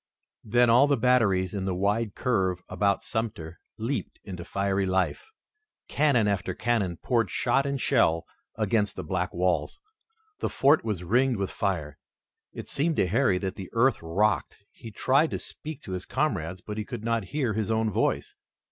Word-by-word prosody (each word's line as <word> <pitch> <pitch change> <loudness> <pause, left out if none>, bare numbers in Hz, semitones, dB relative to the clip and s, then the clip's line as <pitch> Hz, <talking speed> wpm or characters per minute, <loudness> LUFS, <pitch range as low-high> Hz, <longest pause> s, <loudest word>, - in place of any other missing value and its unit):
Then 120 +3 +3
all 125 +5 +6
the 140 - +2
batteries 110 -7 +2
in 100 -2 -3
the 95 -2 -1
wide 100 +3 0
curve 95 -7 0
about 100 +2 0
Sumter 100 -8 -4 0.2
leaped 120 +6 -3
into 90 -3 -7
fiery 100 +1 -1
life. 95 - -1 0.6
Cannon 135 -8 +2
after 100 0 -1
cannon 105 -7 0
poured 115 +4 0
shot 135 +3 +1
and 140 -1 -2
shell 85 -12 +2 0.3
against 105 -2 0
the - - -5
black 90 -1 -2
walls. 90 -3 -1 0.6
The - - -1
fort 140 +3 +3
was 105 -6 -3
ringed 125 +6 +2
with 100 -1 -2
fire. 75 -7 -2 0.5
It - - -8
seemed 160 +3 0
to - - +2
Harry 100 0 +2
that 95 0 -4
the 95 -2 -7
earth 120 +1 +3
rocked. 95 +6 0 0.2
He 115 - -11
tried 135 +8 +2
to - - -3
speak 155 -2 -7
to - - -8
his 90 0 -4
comrades, 95 - -2
but 105 0 -6
he - - -1
could 115 +1 -7
not 115 -2 0
hear 125 +1 -1
his 110 0 -2
own 110 -1 +1
voice. - - 0
105 Hz, 175 wpm, -27 LUFS, 95-120 Hz, 0.6 s, all